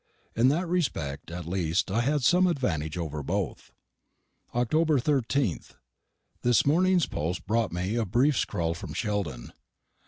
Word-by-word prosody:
In 115 +3 +4
that 165 +7 +1
respect 85 - -2
at 85 0 -6
least 85 0 0
I 115 - +2
had 145 +2 0
some 180 +8 +5
advantage 85 - -1
over 75 -3 -3
both. 65 - -3 0.8
October 155 +6 +2
13th. 125 - 0 0.7
This 120 -2 +3
morning's 180 +3 +3
post 85 +5 -3
brought 115 -1 0
me 90 +4 -2
a 115 - +1
brief 130 +9 +3
scrawl 85 -6 -1
from 85 - -8
Sheldon. 100 - -3
115 Hz, 135 wpm, -27 LUFS, -, 0.8 s, some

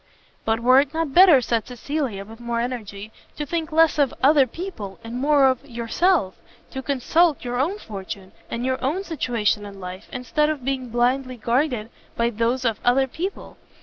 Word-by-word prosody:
"But 225 +1 +1
were 255 +2 +6
it 285 +2 -1
not 325 -4 -1
better," 350 -6 +8
said 230 -2 -1
Cecilia, 250 -5 -3
with 225 +2 -13
more 235 -1 -2
energy, 220 -4 -5 0.3
"to 295 - -3
think 325 +2 -3
less 320 -1 +4
of 280 -3 +3
other 280 -1 +6
people, 230 - -7
and 230 +2 -5
more 285 0 +4
of 260 0 0
yourself? 240 - 0 0.4
to 265 - -5
consult 285 +4 +1
your 245 0 -2
own 340 +10 0
fortune, 195 - -8 0.2
and 235 +1 -3
your 260 0 -1
own 315 +9 0
situation 235 - -1
in 200 -1 -9
life, 185 +1 -8
instead 300 +5 0
of 290 -5 -3
being 260 -2 -2
blindly 250 +2 0
guided 240 -1 0 0.2
by 235 0 +1
those 235 +3 0
of 225 -3 0
other 260 +2 +4
people? 350 +9 -6
255 Hz, 180 wpm, -23 LUFS, 230-295 Hz, 0.4 s, better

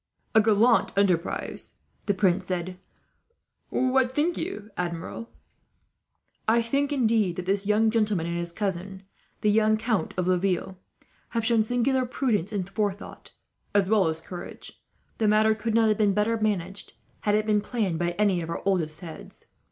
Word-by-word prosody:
"A 220 - +6
gallant 220 0 +3
enterprise," 185 -4 0 0.3
the 200 - +2
prince 190 -1 +1
said. 185 0 -3 0.9
"What 260 0 +1
think 320 +3 +1
you, 225 - -5
Admiral?" 180 +6 -4 1.2
"I 230 +1 +4
think, 280 +5 0
indeed, 225 -9 +2
that 180 - -5
this 195 +1 0
young 220 +1 +3
gentleman 210 -6 +1
and 170 0 -3
his 170 0 -4
cousin, 190 0 -4 0.4
the 210 - +3
young 215 0 +3
Count 220 -2 -1
of 180 - 0
Laville, 185 +1 0 0.6
have 230 - 0
shown 230 -1 +4
singular 245 +3 +1
prudence 225 -7 -1
and 195 -4 -2
forethought, 205 0 -4 0.5
as 200 0 +3
well 210 -5 +4
as 160 0 -2
courage. 175 0 -10 0.4
The 220 - +2
matter 215 +1 +4
could 220 +1 -2
not 225 -1 +4
have 215 - +1
been 205 -2 +3
better 210 +2 +2
managed, 200 -3 -2 0.3
had 210 0 +1
it 215 0 +1
been 210 -1 +2
planned 205 -7 -2
by 175 0 0
any 200 -4 +2
of 165 - -6
our 170 - -4
oldest 170 -5 0
heads. 165 -3 -10
210 Hz, 160 wpm, -26 LUFS, 185-225 Hz, 1.2 s, A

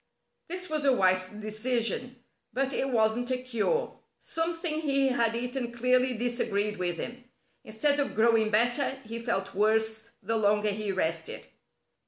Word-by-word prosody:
This 365 +2 -4
was 310 -3 -1
a 275 -2 +4
wise 185 -4 +3
decision, 225 +4 -2 0.4
but 270 +3 -1
it 270 - 0
wasn't 230 0 +1
a 255 - +1
cure. 255 - -1 0.2
Something 330 -1 -2
he 275 -3 +2
had 230 -2 +1
eaten 245 +1 -3
clearly 250 +1 +2
disagreed 215 -3 -1
with 175 -2 -1
him. 245 +5 -6 0.4
Instead 285 +7 +1
of 280 - -1
growing 220 0 +4
better 240 +5 +2
he 230 +1 -5
felt 195 -5 -2
worse 220 +2 +1
the 225 - 0
longer 210 0 +2
he 205 0 -2
rested. 165 -3 -2
235 Hz, 145 wpm, -28 LUFS, 215-260 Hz, 0.4 s, a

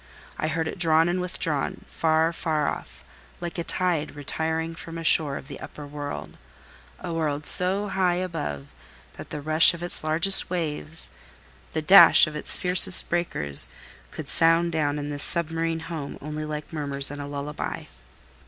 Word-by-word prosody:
I 155 - -1
heard 160 0 -2
it 180 - -7
drawn 165 -1 +3
and 180 +1 -1
withdrawn 165 -5 -3
far, 160 +1 0
far 155 -2 -2
off, - - -7 0.4
like 175 0 -6
a - - -2
tide 165 -5 -2
retiring 160 +3 -3
from 165 0 -9
a 165 - -6
shore 150 -3 +2
of - - -11
the 140 - -9
upper 150 - -10
world—a 145 - -10
world 150 -2 -3
so 190 +3 +1
high 185 -2 0
above 160 - -5 0.4
that - - -10
the 150 - -6
rush 155 +3 +4
of 170 - -9
its 175 - -5
largest 165 +5 +5
waves, 165 -2 -5 0.6
the 155 - -3
dash 195 +6 +8
of 155 -1 -8
its 150 - +1
fiercest 180 0 +6
breakers, 75 - +2 0.4
could - - -9
sound 165 +1 +2
down 150 -2 -1
in 145 0 -5
this 145 -1 -3
submarine 165 0 -2
home, 160 -4 -7
only 150 +1 -6
like 150 +1 -7
murmurs 140 -2 0
and 145 0 -7
a 140 - -7
lullaby. 145 +1 -6
160 Hz, 160 wpm, -24 LUFS, 145-170 Hz, 0.6 s, dash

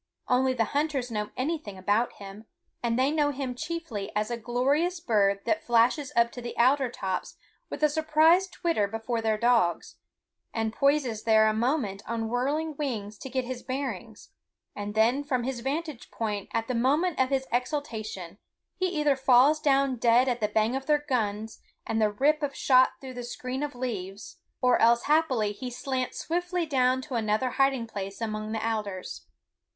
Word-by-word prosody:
Only 255 +1 +2
the 230 - +2
hunters 285 -4 -1
know 210 -1 -2
anything 270 - -3
about 205 +5 +1
him, 200 +2 -11 0.4
and 235 -1 0
they 265 +3 +2
know 300 -2 +2
him 270 -2 -3
chiefly 245 -8 -5
as 210 +2 -1
a - - 0
glorious 275 +10 0
bird 200 -8 +2
that 320 - 0
flashes 240 +4 +2
up 235 0 +3
to 245 - -8
the 240 - -7
alder 260 +2 +3
tops 190 -5 -4 0.3
with 300 - -5
a - - +7
surprised 315 +5 +3
twitter 335 - 0
before 225 +2 -3
their 220 -1 +1
dogs, 225 -7 +1 0.6
and 225 -1 -1
poises 275 -6 +1
there 220 -1 +4
a 215 - +3
moment 220 -4 -1
on 225 -1 -2
whirring 290 +6 -1
wings 220 -8 -3
to 265 - -7
get 260 0 -2
his 250 0 -5
bearings, 245 -5 -5 0.5
and 205 +1 -5
then 235 +6 +3
from 255 -4 -1
his 255 0 -3
vantage 290 +2 -4
point 210 -3 -3
at 225 0 -1
the 255 - -1
moment 290 +9 +1
of 260 0 +3
his 270 -1 0
exultation 220 - -3 0.4
he 370 - +1
either 300 -5 +1
falls 265 +3 +5
down 275 -3 +2
dead 235 +2 +4
at 245 -2 0
the 210 - +1
bang 220 +3 +1
of 270 0 -4
their 295 -1 +2
guns 220 -4 -2 0.2
and 225 0 -1
the 215 - +4
rip 290 +9 +2
of 285 -2 -2
shot 255 -1 +4
through 260 -1 -8
the 245 -1 -6
screen 255 +2 -5
of 295 -3 -4
leaves, 235 - -5 0.3
or 250 -1 +4
else 235 +1 +5
happily 275 -9 +2
he 250 +5 -6
slants 255 +1 -3
swiftly 355 +1 -1
down 260 -3 +2
to 275 - -8
another 225 +2 0
hiding 270 -3 +1
place 195 -3 -6
among 215 -1 -3
the 220 0 -2
alders. 205 -4 -4
250 Hz, 180 wpm, -27 LUFS, 220-280 Hz, 0.6 s, a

